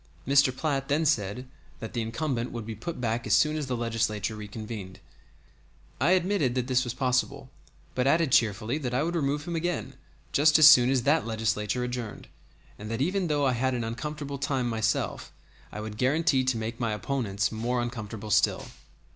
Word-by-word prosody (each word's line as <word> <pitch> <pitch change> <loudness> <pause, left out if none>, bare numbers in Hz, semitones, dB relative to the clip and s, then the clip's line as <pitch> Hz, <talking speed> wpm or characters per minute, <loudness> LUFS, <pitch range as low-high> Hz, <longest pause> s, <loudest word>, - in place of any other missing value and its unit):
Mr. 140 -1 +4
Platt 135 -3 -1
then 155 +3 +1
said 110 0 0 0.3
that 110 - -7
the 120 - -1
incumbent 120 +2 -2
would 115 -2 -6
be 115 - -5
put 125 +10 -6
back 115 -1 -2
as 105 - +4
soon 150 +4 +3
as 150 -3 -3
the 125 -2 -2
Legislature 110 -2 -1
reconvened; 105 -2 -7 1.0
I 150 +8 +4
admitted 180 -8 +1
that 125 -1 0
this 130 0 +2
was 120 -2 -4
possible, 125 0 -1 0.4
but 125 +1 0
added 160 0 +3
cheerfully 115 +4 +2
that 125 -4 -3
I 135 - +2
would 170 +2 -2
remove 145 -1 -1
him 170 - -3
again 175 +1 -2 0.4
just 150 +1 +5
as 155 -1 +9
soon 125 -5 +8
as 130 -2 +1
that 145 0 +2
Legislature 110 +1 -1
adjourned, 125 -3 -5 0.5
and 105 +1 -7
that 115 +1 -3
even 180 +6 0
though 145 -2 +1
I 130 - +2
had 130 +2 0
an 120 - -2
uncomfortable 140 +4 -5
time 130 -3 -1
myself, 110 -1 -1 0.4
I - - -6
would 105 0 -7
guarantee 140 +1 +2
to 130 -2 +1
make 115 +2 -4
my 115 -3 -1
opponents 105 -3 -1
more 120 +3 -1
uncomfortable 110 -3 -5
still. - - +2
125 Hz, 185 wpm, -27 LUFS, 110-145 Hz, 1.0 s, as